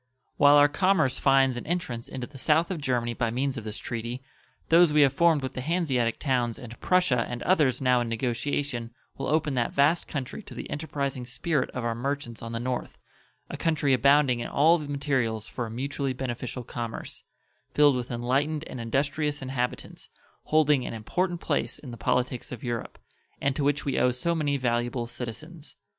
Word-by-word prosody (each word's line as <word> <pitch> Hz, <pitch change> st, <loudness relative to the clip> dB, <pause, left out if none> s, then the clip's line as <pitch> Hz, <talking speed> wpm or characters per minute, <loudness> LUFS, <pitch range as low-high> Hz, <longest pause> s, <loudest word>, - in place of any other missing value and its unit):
While 145 Hz, 0 st, +7 dB
our 145 Hz, 0 st, +7 dB
commerce 160 Hz, -3 st, +2 dB
finds 135 Hz, -2 st, +4 dB
an -, -, -7 dB
entrance 140 Hz, -9 st, -3 dB
into 125 Hz, -2 st, -5 dB
the 135 Hz, +1 st, -12 dB
south 160 Hz, +6 st, +2 dB
of 170 Hz, -5 st, -3 dB
Germany 120 Hz, -3 st, 0 dB
by 115 Hz, 0 st, -1 dB
means 130 Hz, +4 st, -1 dB
of 115 Hz, -, -5 dB
this 105 Hz, 0 st, -5 dB
treaty, 120 Hz, +2 st, -5 dB, 0.5 s
those 170 Hz, -1 st, +6 dB
we 150 Hz, 0 st, +5 dB
have 135 Hz, -2 st, +5 dB
formed 165 Hz, -2 st, +3 dB
with 130 Hz, -, -4 dB
the 130 Hz, -, -4 dB
Hanseatic 135 Hz, -7 st, 0 dB
towns 125 Hz, -5 st, 0 dB
and 120 Hz, -2 st, -10 dB
Prussia 180 Hz, -10 st, +3 dB
and 120 Hz, 0 st, -4 dB
others 140 Hz, -8 st, +2 dB
now 125 Hz, -1 st, +4 dB
in 120 Hz, -, -2 dB
negotiation 120 Hz, +1 st, -2 dB, 0.2 s
will -, -, -4 dB
open 155 Hz, -1 st, +1 dB
that 120 Hz, -2 st, 0 dB
vast 150 Hz, +5 st, +3 dB
country 135 Hz, +6 st, -5 dB
to -, -, -12 dB
the -, -, -6 dB
enterprising 140 Hz, -4 st, -3 dB
spirit 140 Hz, +2 st, -1 dB
of 125 Hz, -2 st, -4 dB
our 115 Hz, -, 0 dB
merchants 125 Hz, -1 st, -4 dB
on 115 Hz, -, -6 dB
the 115 Hz, -, -3 dB
north 125 Hz, +1 st, -3 dB, 0.5 s
a -, -, -6 dB
country 155 Hz, -4 st, +1 dB
abounding 140 Hz, -1 st, +4 dB
in 120 Hz, -, -3 dB
all 165 Hz, +4 st, +4 dB
the 150 Hz, -, -6 dB
materials 135 Hz, -6 st, -1 dB
for 120 Hz, -2 st, -4 dB
a -, -, -8 dB
mutually 135 Hz, +3 st, -2 dB
beneficial 125 Hz, -1 st, -4 dB
commerce, 115 Hz, -1 st, -6 dB, 0.5 s
filled 145 Hz, -2 st, +6 dB
with 125 Hz, 0 st, -3 dB
enlightened 135 Hz, +6 st, 0 dB
and 130 Hz, -6 st, -7 dB
industrious 145 Hz, +5 st, -1 dB
inhabitants, 125 Hz, -2 st, -4 dB, 0.4 s
holding 150 Hz, -4 st, +3 dB
an -, -, -5 dB
important 175 Hz, -, -1 dB
place -, -, -1 dB
in 130 Hz, -, -10 dB
the -, -, -7 dB
politics 125 Hz, +2 st, -1 dB
of 125 Hz, -, -7 dB
Europe, 120 Hz, -2 st, -4 dB, 0.4 s
and 140 Hz, -1 st, 0 dB
to 145 Hz, -, -1 dB
which 145 Hz, 0 st, +1 dB
we 140 Hz, -, 0 dB
owe 125 Hz, -, +4 dB
so 125 Hz, +8 st, 0 dB
many 145 Hz, -3 st, 0 dB
valuable 120 Hz, -1 st, -1 dB
citizens. 145 Hz, +7 st, -8 dB
135 Hz, 190 wpm, -27 LUFS, 120-150 Hz, 0.5 s, While